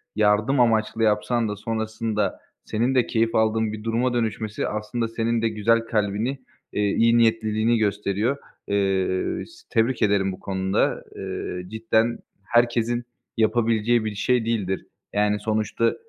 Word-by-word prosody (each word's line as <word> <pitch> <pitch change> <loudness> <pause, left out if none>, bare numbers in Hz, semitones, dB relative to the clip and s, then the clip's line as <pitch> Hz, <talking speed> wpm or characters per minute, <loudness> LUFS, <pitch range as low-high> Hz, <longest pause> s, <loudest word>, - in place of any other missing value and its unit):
yardım 110 +5 +3
amaçlı 115 -1 +2
yapsan 110 +2 +1
da 105 - -3
sonrasında 110 0 -2 0.3
senin 120 +5 0
de 125 - +3
keyif 115 0 +1
aldığın 110 0 +2
bir 105 -1 -7
duruma 115 +3 0
dönüşmesi 110 -2 -2
aslında 110 +2 -2
senin 115 0 -1
de 115 - +2
güzel 110 +2 +2
kalbini, 110 +3 -1 0.4
eee, - - 0
iyi 115 +3 +3
niyetliliğini 115 0 +2
gösteriyor. 105 +4 0 0.3
Eee, 95 -2 0
s 345 +1 -18
tebrik 115 +1 +1
ederim 100 -2 +2
bu 95 - -8
konuda. 95 0 0
Eee, 90 0 -5
cidden 110 +2 +1 0.2
herkesin 120 +2 +1 0.3
yapabileceği 115 0 +2
bir 105 -1 -3
şey 125 +3 +1
değildir. 100 -5 -1 0.3
Yani, 105 0 +2
sonuçta, 110 +1 0
110 Hz, 135 wpm, -24 LUFS, 105-115 Hz, 0.4 s, yardım